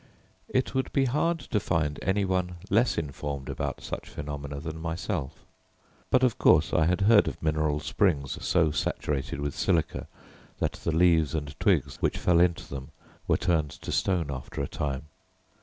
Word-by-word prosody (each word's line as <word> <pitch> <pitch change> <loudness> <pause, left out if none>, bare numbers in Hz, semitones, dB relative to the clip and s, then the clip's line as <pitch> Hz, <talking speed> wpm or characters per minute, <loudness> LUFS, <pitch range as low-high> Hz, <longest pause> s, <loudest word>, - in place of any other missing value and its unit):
It 130 0 0
would 130 -1 -1
be 135 - +3
hard 150 +6 +1
to 105 - -1
find 80 -6 -1
any 95 +1 +1
one 90 -1 -1 0.2
less 115 +5 +3
informed 70 -2 -4
about - - -3
such - - -6
phenomena 70 -1 -5
than 80 +1 -6
myself; 80 -3 -4 0.6
but 130 0 +4
of 125 -4 +2
course - - +5
I 80 - +4
had 90 +2 +1
heard 105 +1 +6
of - - -4
mineral 75 -1 0
springs 75 -4 0
so 85 -4 +3
saturated 70 -1 -2
with 70 -1 -2
silica 85 -5 0 0.5
that - - 0
the - - -3
leaves 80 -2 +3
and 75 -2 -3
twigs - - +2
which - - +1
fell 85 -1 +3
into 85 -1 +2
them 70 +1 -7 0.4
were - - +3
turned 80 -5 +1
to - - -7
stone 85 -7 +1
after 70 +1 -5
a - - -2
time. 70 -2 -3
80 Hz, 170 wpm, -28 LUFS, 75-95 Hz, 0.6 s, heard